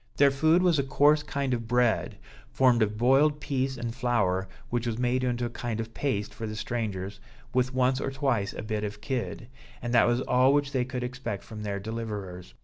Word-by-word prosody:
Their 140 -1 +6
food 160 +6 +3
was 170 -5 +3
a - - +2
coarse 145 +3 +4
kind 140 -2 -2
of 115 -2 -3
bread, 120 -1 +1 0.3
formed 125 -3 +4
of 105 0 +1
boiled 135 +5 +4
pease 135 -2 -1
and 115 -1 -4
flour, 115 -7 0 0.2
which 120 0 -1
was 115 -1 -2
made 125 +1 +1
into 120 -1 0
a - - -2
kind 120 -2 -4
of 115 0 -5
paste 105 -7 -2
for 110 - -5
the 110 - -5
strangers, 105 -4 -3 0.3
with 125 +1 +2
once 130 +1 +2
or - - -1
twice 135 -7 0
a - - -7
bit 110 -1 -2
of 105 -1 -4
kid; 120 -2 -3 0.3
and 120 -1 -4
that 120 - +5
was 120 +1 +2
all 130 +2 +4
which 145 -1 +1
they 130 -3 0
could 125 -1 -4
expect 125 -5 -4
from 110 -1 -9
their 100 -1 -3
deliverers. 100 - -6
120 Hz, 210 wpm, -28 LUFS, 110-135 Hz, 0.3 s, Their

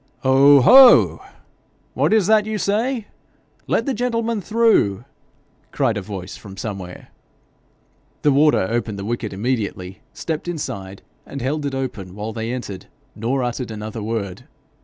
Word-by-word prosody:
'Ho! 135 +1 +6
ho! 255 - +7 0.7
what - - +1
is 215 -4 +3
that 215 +1 +3
you 215 0 -2
say? 220 +4 -1 0.6
Let - - 0
the 275 - -1
gentlemen 230 -3 -1
through,' 215 - +2 0.6
cried 125 -5 0
a 105 - -3
voice 95 -2 -7
from 100 -1 -12
somewhere. 95 -4 -7 1.1
The 145 - +4
warder 145 -6 +3
opened 115 -2 -2
the 100 - -6
wicket 115 -1 -3
immediately, 100 -3 -3
stepped 160 0 -5
inside, 100 - -6 0.2
and 140 - -8
held 145 +3 -2
it 135 - -4
open 110 -9 -5
while 105 +2 -5
they 115 +1 -4
entered, 105 -7 -6 0.3
nor 125 +4 -1
uttered 120 0 -3
another 110 0 -6
word. 105 -4 -4
125 Hz, 140 wpm, -20 LUFS, 105-170 Hz, 1.1 s, ho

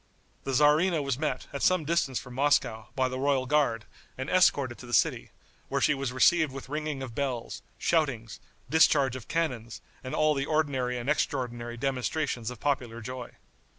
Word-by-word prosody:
The 135 - -2
tzarina 150 +4 +4
was 140 -2 -2
met, 135 -5 -2
at 140 - -4
some 185 -4 +3
distance 145 -5 0
from 125 - -7
Moscow, 125 -5 +1
by 130 -1 +2
the 130 0 -4
royal 135 -1 +1
guard, 130 -6 +1 0.3
and 130 +2 -4
escorted 140 -9 +3
to 125 - -10
the 120 - +1
city, - - +1 0.4
where - - 0
she - - +3
was 135 -2 -3
received 155 +4 +4
with 135 0 -9
ringing 150 -2 -3
of 125 -3 -7
bells, 130 -3 -3 0.2
shoutings, 135 -10 0 0.3
discharge 145 -5 +4
of 130 - -8
cannons 125 - -2 0.2
and 130 - -4
all 155 0 +3
the 140 0 -2
ordinary 135 -5 0
and 120 +1 -5
extraordinary 120 -5 -1
demonstrations 130 -1 -2
of 125 -3 -8
popular 125 -5 -1
joy. 125 +1 -7
135 Hz, 175 wpm, -28 LUFS, 125-150 Hz, 0.4 s, tzarina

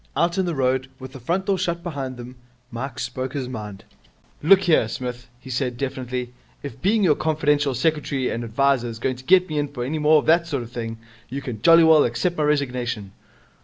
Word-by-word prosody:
Out 170 +2 +1
in 185 - +1
the 170 - -2
road, 130 0 0
with 130 -1 -9
the 135 - -9
front 175 +10 -1
door 195 -2 +1
shut 170 -1 -2
behind 135 -7 -5
them, 125 +1 -9 0.4
Mike 125 +2 -5
spoke 130 -2 -4
his 135 -3 -3
mind. 105 -5 -7 0.6
'Look 190 +5 +6
here, 160 -10 +3
Smith,' 125 +1 -6
he 130 0 -10
said 125 -1 -2
definitely, 125 -2 -4 0.3
'if 140 -2 -8
being 210 +3 +2
your 165 -5 +5
confidential 150 -3 +1
secretary 140 -1 0
and 115 - -3
adviser 125 +2 +1
is 115 -1 -6
going 125 +2 -2
to 130 - -14
let 185 0 +6
me 155 -2 -2
in 145 - 0
for 135 -4 -6
any 150 +5 -2
more 155 +1 +5
of 150 - 0
that 170 +1 +4
sort 140 -6 -2
of 115 - -12
thing, 115 -2 -5 0.3
you 135 +3 -5
can 115 -6 -6
jolly 165 +5 +7
well 160 -2 +6
accept 170 +9 -1
my 155 - 0
resignation.' 125 -8 -1
135 Hz, 215 wpm, -23 LUFS, 125-155 Hz, 0.6 s, jolly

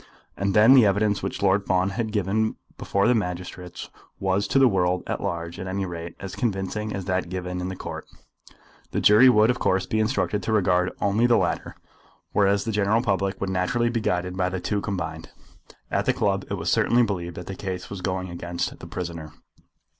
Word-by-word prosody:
And 100 -1 -1
then 110 +4 +7
the 130 -3 +8
evidence 100 +1 +1
which - - -4
Lord 100 +1 +2
Fawn 95 +1 +2
had 110 +1 -3
given 105 +1 0 0.2
before 100 0 0
the 125 - +5
magistrates 90 -3 -4 0.3
was 95 +1 0
to - - +1
the 135 -1 +7
world 90 -4 +1
at - - -3
large 85 0 -4
at 95 - -5
any 95 +1 -2
rate 85 -1 -7
as 95 -1 -7
convincing 105 -1 -2
as 95 -3 -4
that 90 -2 -1
given 90 0 -4
in 90 - -3
the 95 - -5
Court. - - -7 0.8
The - - -1
jury 110 +5 +7
would, 110 -1 +5
of 125 - -4
course, 95 0 +1
be 110 - -1
instructed 110 -2 0
to 105 - -3
regard 90 -4 +2
only 105 +4 +3
the 120 -1 +4
latter; - - -1 0.6
whereas 100 0 +2
the 115 - -1
general 105 +2 +2
public 95 -3 0
would 100 -1 -2
naturally 120 +6 +1
be 115 -1 -1
guided 90 -2 -1
by 90 -1 0
the 95 0 -3
two 100 +3 -1
combined. 80 -6 -4 0.6
At - - 0
the - - +4
club - - 0
it - - -1
was - - -2
certainly 120 +1 +3
believed 85 -6 -3
that 90 - -7
the 95 - -6
case 95 -1 -6
was 100 -2 -6
going 95 -1 -3
against 85 0 -4
the - - -9
prisoner. 85 -4 -6
95 Hz, 205 wpm, -24 LUFS, 90-105 Hz, 0.8 s, the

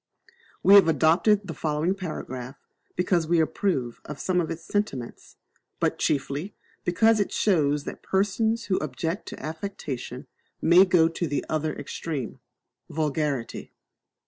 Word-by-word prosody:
We 195 - +7
have 200 -4 +9
adopted 170 - +3
the 165 - -5
foregoing 155 +4 0
Paragraph 140 -8 -6 0.4
because 180 -3 +1
we 170 0 +3
approve 155 - -1
of 150 - -7
some 180 +4 +1
of 165 - -3
its 165 0 -5
sentiments, 165 - -4 0.4
but - - 0
chiefly 145 +7 -1 0.3
because 220 +5 +3
it 205 - 0
shows 150 -7 +2
that - - -7
persons 220 +4 0
who 190 - +1
object 170 +4 -3
to - - -7
affectation 155 -7 -6 0.3
may 175 +3 +6
go 175 -4 +4
to 165 +1 -3
the 145 -1 -2
other 155 0 -1
extreme 145 -2 -5 0.5
vulgarity. 150 -5 -2
165 Hz, 135 wpm, -26 LUFS, 145-190 Hz, 0.5 s, have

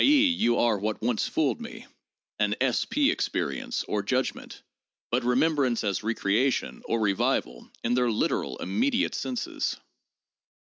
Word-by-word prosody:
e., 285 0 +6
you 120 - +2
are 115 -4 +2
what 110 +2 -2
once 115 -1 0
fooled 155 - 0
me 230 0 -8 0.5
(an - - +2
8 - - +1
P 295 0 +3
experience, 270 -7 -2
or 105 - 0
judgment), 130 +6 -2 0.5
but - - +1
remembrance 130 -1 +2
as 100 -3 -1
recreation, 115 +3 0
or 115 - 0
revival, 95 - 0
in 120 - +1
their 125 -1 +2
literal 110 - -1
immediate 250 - 0
senses. 250 -2 -3
125 Hz, 135 wpm, -27 LUFS, -, 0.5 s, e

